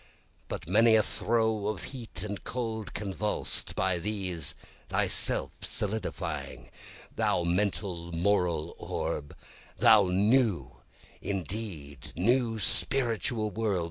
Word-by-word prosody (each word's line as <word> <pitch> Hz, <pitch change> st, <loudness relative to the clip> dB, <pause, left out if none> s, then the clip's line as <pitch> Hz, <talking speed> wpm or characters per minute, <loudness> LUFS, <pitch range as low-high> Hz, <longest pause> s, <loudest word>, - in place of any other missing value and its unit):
By -, -, -3 dB
many 110 Hz, +6 st, +5 dB
a 110 Hz, -, +5 dB
throe 110 Hz, -2 st, 0 dB
of 105 Hz, -4 st, -3 dB
heat 115 Hz, -7 st, -7 dB
and 100 Hz, -2 st, -5 dB
cold 110 Hz, -4 st, -4 dB
convuls'd, 105 Hz, +1 st, -2 dB
(by 95 Hz, -2 st, +1 dB
these 90 Hz, -5 st, -2 dB, 0.3 s
thyself -, -, +3 dB
solidifying,) 105 Hz, -1 st, -3 dB, 0.4 s
Thou 85 Hz, -, +2 dB
mental, 90 Hz, -1 st, -1 dB
moral 85 Hz, -2 st, +1 dB
orb 75 Hz, +2 st, -3 dB, 0.4 s
thou -, -, +7 dB
New, 105 Hz, +2 st, +2 dB, 0.4 s
indeed 90 Hz, -, -5 dB
new, 115 Hz, +5 st, +2 dB
Spiritual 115 Hz, -2 st, +1 dB
World! 105 Hz, -2 st, 0 dB
100 Hz, 100 wpm, -29 LUFS, 90-110 Hz, 0.4 s, thou